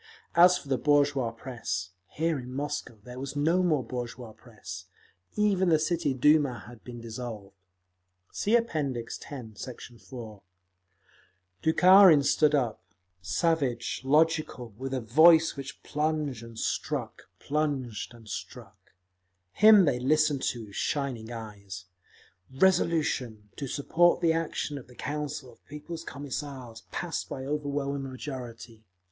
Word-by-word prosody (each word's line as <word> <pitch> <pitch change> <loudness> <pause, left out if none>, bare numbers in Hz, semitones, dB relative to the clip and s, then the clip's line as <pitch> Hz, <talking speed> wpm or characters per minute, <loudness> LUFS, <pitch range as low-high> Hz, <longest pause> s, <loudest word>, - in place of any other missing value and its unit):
As 180 +1 +7
for 145 - -11
the 135 -2 0
bourgeois 145 -4 +3
press, 115 -7 -5 0.2
here 160 -1 -1
in 125 0 -8
Moscow 140 -3 -4
there 125 +2 -9
was 135 +1 -5
no 165 +5 +2
more 155 -7 +2
bourgeois 120 -1 -6
press; 95 -6 -10 0.5
even 195 -3 +2
the 160 - +5
City 165 -1 0
Duma 145 -1 +3
had 120 -2 -13
been 120 -1 -9
dissolved. 110 -4 -7 0.8
(See 220 +4 +2
App. 230 -6 -3
X, 130 -6 -2 0.3
Sect. 120 +4 -8 0.3
4) 110 -6 -9 1.2
Bukharin 180 -1 +7
stood 150 +1 +3
up, 125 -6 -1 0.4
savage, 125 - 0
logical, 150 -5 +1
with 130 +4 -5
a 130 - -2
voice 160 +8 +6
which 140 -1 -8
plunged 150 -4 -1
and 115 -1 -11
struck, - - -3
plunged 140 -7 -2
and 115 -2 -16
struck…. - - -9 0.6
Him 210 - +7
they 130 -5 +1
listened 150 +1 +2
to 115 -2 -2
with 100 - -14
shining 125 -6 -2
eyes. 100 -5 -8 0.7
Resolution, 135 - +1
to 140 - -5
support 170 +6 +3
the 165 -1 +3
action 155 -3 -2
of 125 - -14
the 125 - -16
Council 150 -1 -4
of 115 - -23
People's 160 +3 -7
Commissars, 140 -5 -6
passed 175 -1 -3
by 130 -1 -5
overwhelming 140 -1 -2
majority. 120 -4 -8
140 Hz, 130 wpm, -28 LUFS, 120-155 Hz, 1.2 s, As